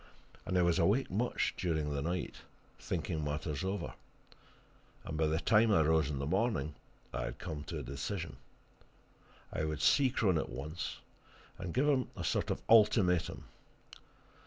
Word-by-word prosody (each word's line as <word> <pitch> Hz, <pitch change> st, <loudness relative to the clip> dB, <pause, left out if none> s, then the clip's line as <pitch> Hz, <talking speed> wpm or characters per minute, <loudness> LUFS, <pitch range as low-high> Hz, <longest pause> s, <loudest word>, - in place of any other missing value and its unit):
And 90 Hz, -, +1 dB
I 90 Hz, -, +4 dB
was 85 Hz, +1 st, +3 dB
awake 100 Hz, +9 st, +2 dB
much 115 Hz, +6 st, 0 dB
during 80 Hz, -4 st, -1 dB
the 70 Hz, -, -1 dB
night, 85 Hz, +4 st, -3 dB, 0.4 s
thinking 80 Hz, -2 st, -2 dB
matters 75 Hz, 0 st, -2 dB
over, 95 Hz, +2 st, -3 dB, 1.1 s
and 80 Hz, -, -4 dB
by 80 Hz, 0 st, +2 dB
the 80 Hz, +1 st, +1 dB
time 110 Hz, +3 st, +4 dB
I 80 Hz, -6 st, +5 dB
rose 80 Hz, -2 st, +3 dB
in 70 Hz, -, -2 dB
the 70 Hz, -, -2 dB
morning 90 Hz, -, 0 dB, 0.4 s
I -, -, -2 dB
had 65 Hz, -, -5 dB
come 80 Hz, -5 st, -5 dB
to -, -, -5 dB
a -, -, -4 dB
decision. 70 Hz, +1 st, -4 dB, 1.2 s
I 80 Hz, -, -1 dB
would 75 Hz, -1 st, -2 dB
see 135 Hz, -2 st, +5 dB
Crone 100 Hz, -, +2 dB
at -, -, -3 dB
once, 75 Hz, +8 st, -5 dB, 0.6 s
and 95 Hz, -2 st, -4 dB
give 135 Hz, -, +2 dB
him 135 Hz, -4 st, +2 dB
a -, -, -4 dB
sort -, -, 0 dB
of -, -, 0 dB
an -, -, -23 dB
ultimatum. 105 Hz, -6 st, +4 dB
85 Hz, 165 wpm, -33 LUFS, 75-100 Hz, 1.2 s, I